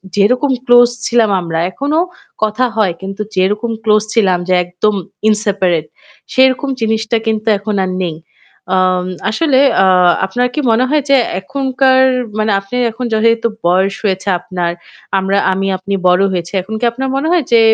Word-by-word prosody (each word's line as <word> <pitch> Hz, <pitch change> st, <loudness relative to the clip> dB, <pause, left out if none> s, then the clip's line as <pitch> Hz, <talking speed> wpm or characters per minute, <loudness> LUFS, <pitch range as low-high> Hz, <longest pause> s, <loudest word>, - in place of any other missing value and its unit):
যেরকম 250 Hz, +7 st, +2 dB
ক্লোজ 245 Hz, -1 st, +6 dB, 0.2 s
ছিলাম 235 Hz, -2 st, +2 dB
আমরা 165 Hz, -1 st, -3 dB
এখনো 285 Hz, -, -1 dB, 0.4 s
কথা 215 Hz, +4 st, +1 dB
হয়। 200 Hz, -5 st, +2 dB
কিন্তু 195 Hz, +2 st, -6 dB
যেরকম 210 Hz, +5 st, 0 dB
ক্লোজ 215 Hz, -1 st, +3 dB
ছিলাম 195 Hz, -5 st, +2 dB
যে 185 Hz, -, +1 dB
একদম 180 Hz, +4 st, -1 dB, 0.4 s
ইনসেপারেট, 195 Hz, -6 st, 0 dB, 0.5 s
সেরকম 260 Hz, +2 st, +3 dB
জিনিসটা 220 Hz, +1 st, 0 dB
কিন্তু 220 Hz, 0 st, -1 dB
এখন 205 Hz, +1 st, -4 dB
আর 185 Hz, -, -2 dB
নেই। 165 Hz, -3 st, -3 dB, 0.6 s
আ -, -, +2 dB, 0.5 s
আসলে 265 Hz, +3 st, +1 dB, 0.2 s
আ -, -, +4 dB, 0.4 s
আপনার 245 Hz, +6 st, -1 dB
কি -, -, -2 dB
মনে 225 Hz, +3 st, +3 dB
হয় 300 Hz, -1 st, +1 dB
যে 275 Hz, -, +6 dB, 0.3 s
এখনকার 265 Hz, +3 st, +1 dB, 0.4 s
মানে 215 Hz, 0 st, +1 dB
আপনি 195 Hz, +5 st, -9 dB, 0.2 s
এখন 245 Hz, +3 st, -5 dB
যেহেতু 230 Hz, +1 st, +2 dB, 0.2 s
বয়স 190 Hz, +2 st, +2 dB
হয়েছে 190 Hz, -1 st, -2 dB
আপনার, 175 Hz, -1 st, -3 dB, 0.5 s
আমরা 195 Hz, +1 st, 0 dB, 0.2 s
আমি 195 Hz, +1 st, -2 dB
আপনি 195 Hz, +2 st, -5 dB
বড় 180 Hz, +2 st, +4 dB
হয়েছি। 170 Hz, -1 st, -4 dB
এখন 205 Hz, +5 st, -9 dB
কি 240 Hz, -, 0 dB
আপনার 265 Hz, +3 st, -4 dB
মনে 275 Hz, +3 st, -1 dB
হয় 350 Hz, -3 st, +2 dB
যে 235 Hz, -, +6 dB
215 Hz, 160 wpm, -14 LUFS, 190-245 Hz, 0.6 s, ক্লোজ